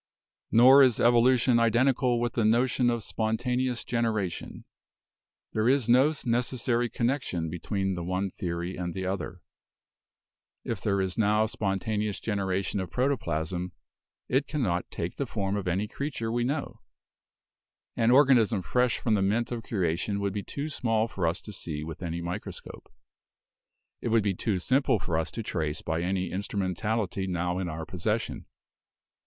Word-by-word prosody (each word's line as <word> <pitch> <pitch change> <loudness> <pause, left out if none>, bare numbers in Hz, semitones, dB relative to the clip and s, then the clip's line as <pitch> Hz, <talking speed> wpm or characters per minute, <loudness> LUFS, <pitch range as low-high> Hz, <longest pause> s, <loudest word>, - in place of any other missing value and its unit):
"Nor 130 +4 +8
is 125 -4 +4
evolution 120 +1 +4
identical 120 +1 +3
with 120 -1 -1
the 115 - +1
notion 120 +3 +3
of 120 -2 -1
spontane 115 +3 -1
ous 120 -1 -3
generation. 110 -6 -2 0.9
There 110 +2 +2
is 135 -3 +2
no 130 +5 +5
necessary 120 0 0
connection 115 - -1
between 95 +2 -2
the 85 -1 -4
one 95 +2 -2
theory 85 0 -4
and 85 -2 -4
the 95 -1 -3
other. 95 -2 -4 1.2
If - - -4
there 100 -2 +1
is 95 +2 -2
now 105 0 +3
spontaneous 105 0 -2
generation 100 -2 -1
of 95 -2 -4
protoplasm, 90 - -1 0.5
it 135 +3 +1
cannot 105 - -1
take - - -5
the - - -2
form 100 0 -2
of 100 -2 -3
any 95 +4 0
creature 120 -2 -4
we 120 +1 0
know. 140 +2 -3 1.1
An 115 - +2
organism 120 -7 +5
fresh 125 +3 +1
from 115 - 0
the 105 - +2
mint 110 +5 +1
of 120 -1 -3
creation 100 -1 -1
would 100 -1 -1
be 105 - -2
too 140 +8 -5
small 115 -6 0
for 95 -6 -2
us 80 - -2
to 105 - -8
see 75 -5 -5
with 80 +2 -7
any 85 -1 -3
micro 90 +5 -4
scope. - - -12 1.1
It - - -3
would 115 -2 +3
be 100 -1 +1
too 100 +2 -1
simple 130 +6 +2
for 95 -4 -3
us 80 - -2
to 115 - -5
trace 80 -6 -3
by 80 +1 -1
any 95 +1 -1
instrumentality 100 +1 -2
now 90 0 -1
in 90 -2 -2
our 80 0 -5
possession. 105 +7 -3
105 Hz, 160 wpm, -28 LUFS, 90-120 Hz, 1.2 s, Nor